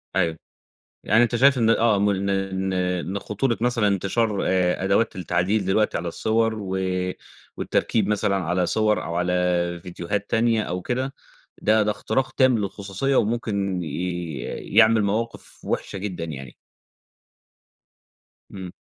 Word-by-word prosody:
أيوه، 85 -3 +1 0.7
يعني 110 - +4
أنت 120 0 +1
شايف 135 +2 +5
إن 115 -2 +3
آه، 115 -2 +3
م 100 +1 +2
إن 100 0 -1
إن 95 -1 -1
إن 90 +1 -1
خطورة 115 +5 -1
مثلًا 120 -3 +2
انتشار 100 +2 0
آآ 90 0 +1
أدوات 100 +3 +1
التعديل 90 +3 0
دلوقتي 100 +3 +1
على 85 - -3
الصوَر، 110 +5 0
و 95 -2 -3 0.8
والتركيب 105 -3 0
مثلًا 105 -1 +1
على 90 0 0
صوَر 110 +2 +1
أو 85 - -4
على 90 +1 0 0.5
فيديوهات 90 +3 -4
تانية 115 -1 +2
أو 90 -1 -4
كده، 130 +5 -2 0.5
ده 110 0 +4
ده 105 - +1
اختراق 130 +6 -1
تام 130 -2 +3
للخصوصية، 100 +6 -2
وممكن 100 -5 0
ي 85 -1 -4 0.4
يعمل 110 0 +6
مواقف 110 +3 -3
وحشة - - -3
جدًا 95 -4 -4
يعني. 70 -6 -8 2.0
إمم. 95 -2 -8
100 Hz, 135 wpm, -23 LUFS, 90-110 Hz, 2.0 s, يعمل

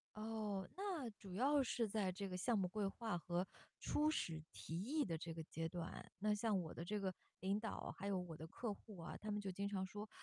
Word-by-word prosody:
哦， 215 -3 -1
那 360 - 0
主 195 -3 -8
要 280 +5 +6
是 235 -2 +2
在 200 -3 +2
这 195 +1 -2
个 180 - -1
项 220 +4 +4
目 185 -2 +3
规 205 0 +1
划 215 -2 0
和 175 +2 +1 0.4
初 305 +1 +4
始 165 - +1
提 165 +2 -3
议 290 +7 +3
的 165 -3 0
这 165 0 -3
个 160 -1 -3
阶 165 +1 -1
段。 175 -1 -4
那 210 +1 +4
像 210 -1 +3
我 160 - -4
的 165 - -4
这 210 +3 +1
个 190 -2 +1 0.3
领 195 +3 +3
导， 220 -2 -2
还 200 - -4
有 195 -2 +3
我 175 -3 -3
的 160 - -5
客 215 +5 -1
户 205 0 -10
啊， 170 0 -4
他 215 - -4
们 210 0 +1
就 195 -2 -1
经 200 +2 0
常 190 -2 +1
说， 210 +2 -5
200 Hz, 250 characters per minute, -43 LUFS, 180-220 Hz, 0.4 s, 要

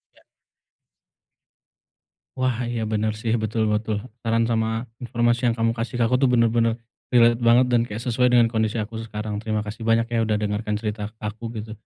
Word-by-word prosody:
Ya. - - -24 2.2
Wah, 125 -2 0
iya, 120 -1 -2
bener 110 0 +1
sih, 115 -1 0
betul 110 +1 0
betul. 110 0 -1 0.3
Saran 115 0 +2
sama 110 -1 +1 0.4
informasi 120 0 +1
yang 115 - +1
kamu 115 0 +2
kasih 115 +3 -3
ke - - +4
aku 125 - +2
tuh 130 - +5
bener-bener 115 -1 +3 0.4
relate 120 -1 +5
banget 120 +2 +6
dan 120 -1 +4
kayak 105 +1 -6
sesuai 125 +1 +2
dengan 120 -1 +5
kondisi 110 0 0
aku 110 +2 -5
sekarang, 105 -1 -5
terima 110 -1 -1
kasih 110 +2 -7
banyak 115 0 +3
ya, 115 - +2
udah 110 -1 +1
dengarkan 105 0 -2
cerita 105 -1 -4
k - - -36
aku 110 +2 -8 0.2
gitu. 110 +1 -8
115 Hz, 180 wpm, -23 LUFS, 110-120 Hz, 2.2 s, banget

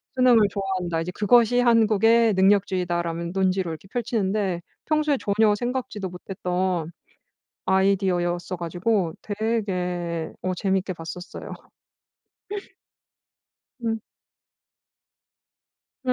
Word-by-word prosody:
수능을 250 -2 +6
좋아한다. 185 -4 -2
이제 170 +2 -4
그것이 235 +4 +4
한국의 225 -1 +4
능력주의다라는 180 -3 +1
논지로 190 -1 +1
이렇게 160 +4 -9
펼치는데 205 -6 -1 0.2
평소에 305 -2 +2
전혀 210 +1 +3
생각지도 240 -5 -3
못했던 180 -2 -2 0.8
아이디어였어 185 -2 +1
가지고 175 +1 0
되게 180 -6 -2
어 185 - -1
재밌게 190 0 -1
봤었어요. 175 +3 -8 2.3
음. 225 -1 0 2.1
네 255 - +3
190 Hz, 240 characters per minute, -24 LUFS, 180-220 Hz, 2.3 s, 수능을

